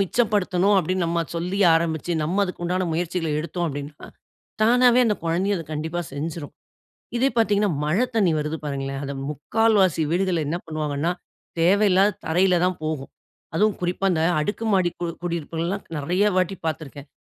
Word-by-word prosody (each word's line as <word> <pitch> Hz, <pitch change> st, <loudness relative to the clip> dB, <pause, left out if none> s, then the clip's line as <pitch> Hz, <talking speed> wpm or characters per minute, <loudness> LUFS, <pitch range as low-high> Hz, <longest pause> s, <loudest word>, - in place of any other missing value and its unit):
மிச்சப்படுத்தனும் 200 Hz, -2 st, +2 dB
அப்படினு 185 Hz, +1 st, 0 dB
நம்ம 170 Hz, 0 st, 0 dB, 0.2 s
சொல்லி 180 Hz, +4 st, -2 dB, 0.2 s
ஆரம்பிச்சு 165 Hz, +1 st, 0 dB
நம்ம 175 Hz, +6 st, 0 dB
அதுக்குண்டான 180 Hz, 0 st, -2 dB
முயற்சிகள 170 Hz, 0 st, -2 dB
எடுத்தோம் 170 Hz, +2 st, -3 dB
அப்படினா, 145 Hz, +1 st, -7 dB, 0.6 s
தானாவே 245 Hz, +2 st, +5 dB
அந்த 210 Hz, -, +1 dB
குழந்தையும் 185 Hz, +5 st, +1 dB
அத 165 Hz, -, -6 dB
கண்டிப்பா 160 Hz, +3 st, -3 dB
செஞ்சுரும். 150 Hz, +1 st, -5 dB, 0.6 s
இதே 260 Hz, +3 st, +3 dB
பாத்தீங்கனா 210 Hz, -2 st, +2 dB
மழ 155 Hz, +5 st, +1 dB, 0.2 s
தண்ணி 200 Hz, -6 st, +3 dB
வருது 150 Hz, +1 st, -2 dB
பாருங்களேன், 135 Hz, -1 st, -3 dB
அது 140 Hz, -, -4 dB, 0.2 s
முக்கால்வாசி 190 Hz, +3 st, +2 dB
வீடுகள்ள 180 Hz, -2 st, +1 dB
என்ன 165 Hz, -, -1 dB
பண்ணுவாங்கனா 155 Hz, 0 st, -2 dB, 0.5 s
தேவையில்லாத 195 Hz, +2 st, +4 dB
தரையில 180 Hz, +3 st, +3 dB
தான் 185 Hz, -1 st, +1 dB
போகும். 155 Hz, -3 st, -3 dB, 0.4 s
அதுவும் 210 Hz, +4 st, +2 dB
குறிப்பா 180 Hz, +2 st, -1 dB
இந்த 160 Hz, -, 0 dB, 0.2 s
அடுக்கு 205 Hz, +8 st, -2 dB
மாடி 185 Hz, -3 st, +3 dB
கு 175 Hz, -, -1 dB, 0.2 s
குடியிருப்புகள் 170 Hz, -1 st, -3 dB
எல்லா 195 Hz, +3 st, -1 dB, 0.2 s
நெறைய 175 Hz, +7 st, +1 dB
வாட்டி 185 Hz, +1 st, +1 dB
பார்த்துருக்கேன். 145 Hz, -2 st, -5 dB
175 Hz, 145 wpm, -23 LUFS, 160-195 Hz, 0.6 s, தானாவே